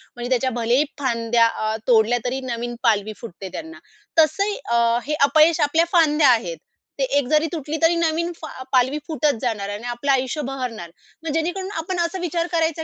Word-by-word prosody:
म्हणजे 240 Hz, +1 st, -5 dB
त्याच्या 260 Hz, 0 st, +1 dB
भलेही 245 Hz, +6 st, +3 dB
फांद्या 230 Hz, -3 st, +2 dB
अ, 215 Hz, -1 st, -2 dB
तोडल्या 235 Hz, 0 st, +4 dB
तरी 260 Hz, +2 st, -1 dB
नवीन 240 Hz, +1 st, -4 dB
पालवी 215 Hz, -2 st, +2 dB
फुटते 195 Hz, -4 st, -8 dB
त्यांना. 325 Hz, +1 st, -8 dB, 0.4 s
तसं 395 Hz, +7 st, +3 dB, 0.2 s
अ, 235 Hz, 0 st, +3 dB
हे 300 Hz, -, -1 dB, 0.2 s
अपयश 320 Hz, +1 st, +4 dB
आपल्या 330 Hz, +2 st, +3 dB
फांद्या 305 Hz, -4 st, +4 dB
आहेत. 180 Hz, -9 st, +1 dB, 0.4 s
ते -, -, +2 dB
एक 270 Hz, -3 st, +1 dB
जरी 310 Hz, +2 st, +2 dB
तुटली 310 Hz, -1 st, -4 dB
तरी 330 Hz, +1 st, +4 dB
नवीन 335 Hz, +1 st, 0 dB
फाल 310 Hz, -5 st, -9 dB
पालवी 260 Hz, +3 st, +3 dB
फुटत 300 Hz, -3 st, +1 dB
जाणार 210 Hz, -5 st, -2 dB
आहे 205 Hz, -, -4 dB
आणि 240 Hz, +3 st, -8 dB
आपलं 240 Hz, +4 st, -1 dB
आयुष्य 265 Hz, +3 st, 0 dB
बहरणार. 245 Hz, -10 st, -5 dB, 0.3 s
मग 320 Hz, -, -3 dB
जेणेकरून 355 Hz, +4 st, -2 dB
आपण 350 Hz, +2 st, -3 dB
असा 345 Hz, +2 st, -1 dB
विचार 340 Hz, 0 st, -1 dB
करायचा 325 Hz, -1 st, 0 dB
270 Hz, 180 wpm, -22 LUFS, 235-325 Hz, 0.4 s, तोडल्या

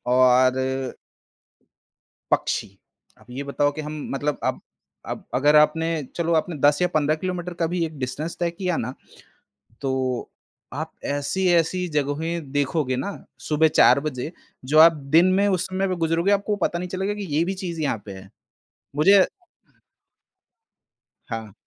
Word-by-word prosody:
और 130 Hz, 0 st, +5 dB, 1.7 s
पक्षी, -, -, 0 dB, 0.5 s
अब 110 Hz, -, -21 dB
ये 135 Hz, +3 st, -5 dB
बताओ 145 Hz, +1 st, +1 dB
कि 155 Hz, -, -6 dB
हम 150 Hz, +1 st, -6 dB, 0.2 s
मतलब 145 Hz, +1 st, -1 dB
अब -, -, -1 dB, 0.5 s
अब -, -, -8 dB
अगर 145 Hz, +4 st, +4 dB
आपने 150 Hz, +2 st, +4 dB, 0.3 s
चलो 170 Hz, -1 st, 0 dB
आपने 160 Hz, 0 st, 0 dB
10 145 Hz, +3 st, +3 dB
या 180 Hz, -, +3 dB
15 155 Hz, 0 st, +2 dB
किलोमीटर 180 Hz, -1 st, -3 dB
का -, -, +3 dB
भी 170 Hz, 0 st, -1 dB
एक 155 Hz, -3 st, -7 dB
डिस्टेंस 140 Hz, +6 st, -4 dB
तय 170 Hz, -1 st, +1 dB
किया 180 Hz, 0 st, -2 dB
ना, 125 Hz, +3 st, -3 dB, 0.9 s
तो 130 Hz, -2 st, -2 dB, 0.4 s
आप -, -, -5 dB
ऐसी-ऐसी 175 Hz, +4 st, +1 dB
जगहें 150 Hz, +1 st, -2 dB
देखोगे 140 Hz, -2 st, 0 dB
ना 200 Hz, +10 st, -3 dB, 0.4 s
सुबह 155 Hz, +1 st, +4 dB
4 140 Hz, -, +7 dB
बजे 150 Hz, +1 st, -4 dB, 0.3 s
जो 150 Hz, +4 st, +2 dB
आप 165 Hz, +1 st, +9 dB, 0.2 s
दिन 175 Hz, +2 st, +7 dB
में 200 Hz, -, +3 dB
उस 185 Hz, -3 st, +1 dB
समय 185 Hz, 0 st, -1 dB
गुज़रोगे, 165 Hz, +4 st, +1 dB
आपको 205 Hz, +1 st, +1 dB
पता 170 Hz, -2 st, -1 dB
नहीं 180 Hz, +1 st, -4 dB
चलेगा 190 Hz, +3 st, -2 dB
कि 205 Hz, -1 st, -5 dB
ये 165 Hz, -, +3 dB
भी 190 Hz, +2 st, -2 dB
चीज 175 Hz, -3 st, -5 dB
यहाँ 140 Hz, -7 st, 0 dB
पे 100 Hz, -, -7 dB
है। 95 Hz, -, -13 dB, 0.7 s
मुझे 190 Hz, +5 st, +6 dB, 2.0 s
हाँ। 110 Hz, -3 st, -6 dB
155 Hz, 150 wpm, -23 LUFS, 140-180 Hz, 2.0 s, आप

